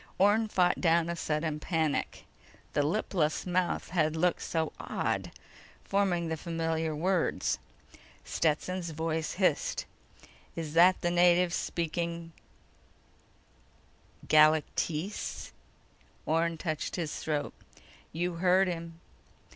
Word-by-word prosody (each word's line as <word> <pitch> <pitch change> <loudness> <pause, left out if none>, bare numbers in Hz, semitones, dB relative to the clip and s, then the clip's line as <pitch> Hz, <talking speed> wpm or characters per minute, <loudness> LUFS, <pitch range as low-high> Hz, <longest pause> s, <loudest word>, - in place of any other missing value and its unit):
Orne 210 +3 +4
fought 180 -3 +2
down 170 -1 +3
a 170 - -2
sudden 155 -1 -2
panic. 160 -2 -1 0.5
The - - +2
lipless 160 -1 0
mouth 180 0 -1
had 155 -3 +1
looked 175 +2 +1
so 160 -1 -2
odd - - -2 0.5
forming 190 -4 +1
the 160 0 -2
familiar 165 -1 -2
words. 180 +2 0 0.7
Stetson's 170 +3 -1
voice 160 0 -2
hissed: 180 -6 0 0.7
"Is 160 -3 -5
that 180 +3 +6
the 175 - +1
native 175 0 +4
speaking 170 0 -3 2.0
Galactese?" 155 +4 +2 0.7
Orne 165 +1 +1
touched 155 -2 -3
his 165 -4 -3
throat. 150 -2 -2 0.2
_"You 175 +1 -6
heard 185 +2 +4
him." 165 -1 -5
170 Hz, 100 wpm, -30 LUFS, 160-180 Hz, 2.0 s, that